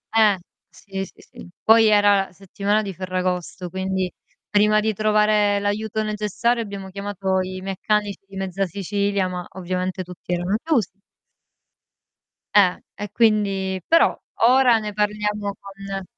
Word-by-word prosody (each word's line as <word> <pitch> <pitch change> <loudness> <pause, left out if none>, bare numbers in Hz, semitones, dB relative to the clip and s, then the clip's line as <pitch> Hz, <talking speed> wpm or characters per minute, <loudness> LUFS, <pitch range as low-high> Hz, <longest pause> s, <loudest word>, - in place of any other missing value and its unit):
Eh. 215 -3 +5 0.3
Sì, 195 -1 -6
sì - - -17
sì. - - -13
Poi, 225 0 +6
era 205 -2 +4
la - - -17
settimana 200 +3 -1
di 195 -2 -5
Ferragosto 185 -1 -3
quindi, 190 0 -2 0.4
prima 210 +1 +4
di 220 +1 0
trovare 210 -1 +3
l'aiuto 215 +1 -1
necessario 215 +3 0
abbiamo 200 -2 -7
chiamato 195 -1 -2
i 185 0 -5
meccanici 200 +2 -1
di 195 - -13
mezza 195 0 -2
Sicilia, 200 +1 -1
ma 180 -1 -5
ovviamente 185 0 -3
tutti 180 0 -7
erano 175 +3 0
chiusi. 225 - 0 1.6
Eh. 190 -3 +5 0.2
E 205 -1 -6
quindi 195 -4 +1
però 330 0 +4 0.3
ora 250 -1 +6
ne 210 -2 -4
parliamo 210 -1 -1
con 195 0 -7
200 Hz, 135 wpm, -22 LUFS, 190-210 Hz, 1.6 s, Poi